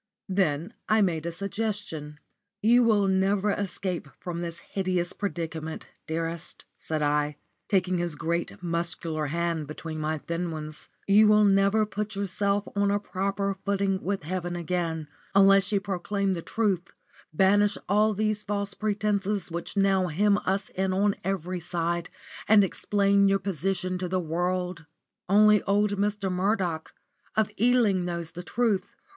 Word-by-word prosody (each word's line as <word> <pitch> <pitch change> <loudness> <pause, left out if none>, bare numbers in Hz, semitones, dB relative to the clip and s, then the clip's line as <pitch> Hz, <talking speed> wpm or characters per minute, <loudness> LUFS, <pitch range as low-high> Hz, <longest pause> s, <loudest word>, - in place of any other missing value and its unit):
Then 180 -4 0 0.2
I 215 0 +5
made 165 -3 -1
a - - -2
suggestion. 195 -6 -4 0.4
"You 240 +3 +6
will 210 -4 +3
never 195 +2 +2
escape 185 -5 -2
from 175 -1 -5
this 170 -1 -3
hideous 180 0 -2
predicament, 165 -5 -4 0.2
dearest," 165 +1 -4
said 155 -1 -2
I, 145 0 +1 0.3
taking 185 -2 +2
his 170 -3 -2
great, 170 +3 -3
muscular 170 -2 -2
hand 165 0 -1
between 155 +1 -6
my 155 +1 -1
thin 170 +3 -3
ones, 155 -1 -7 0.2
"you 210 +2 +6
will 210 0 +6
never 200 +2 +4
put 210 0 -4
yourself 200 +1 0
on 200 0 +2
a 205 0 +2
proper 200 0 -2
footing 195 -1 0
with 195 -1 -2
heaven 175 +1 -3
again, 170 -2 -2 0.3
unless 195 0 +6
you 205 - +3
proclaim 195 0 -1
the 170 - -3
truth, 195 -4 0 0.4
banish 205 +5 +3
all 210 +2 +3
these 215 0 0
false 200 -1 -2
pretences 205 -3 -1
which 170 +4 -5
now 195 -2 +3
hem 200 +5 +2
us 195 +1 0
in 190 0 -1
on 200 +2 +2
every 185 -1 -2
side, 170 0 -2 0.4
and 210 -1 +7
explain 200 +1 +2
your 195 0 +4
position 185 0 -2
to 180 - -2
the 185 +1 0
world. 180 0 -2 0.4
Only 210 +1 +6
old 205 +1 +2
Mr. 200 -1 0
Murdoch, 180 -3 -1 0.4
of 220 -1 +2
Ealing, 225 -5 +3
knows 170 -2 -4
the 175 - -7
truth. 205 -1 -1
190 Hz, 145 wpm, -27 LUFS, 170-200 Hz, 0.4 s, and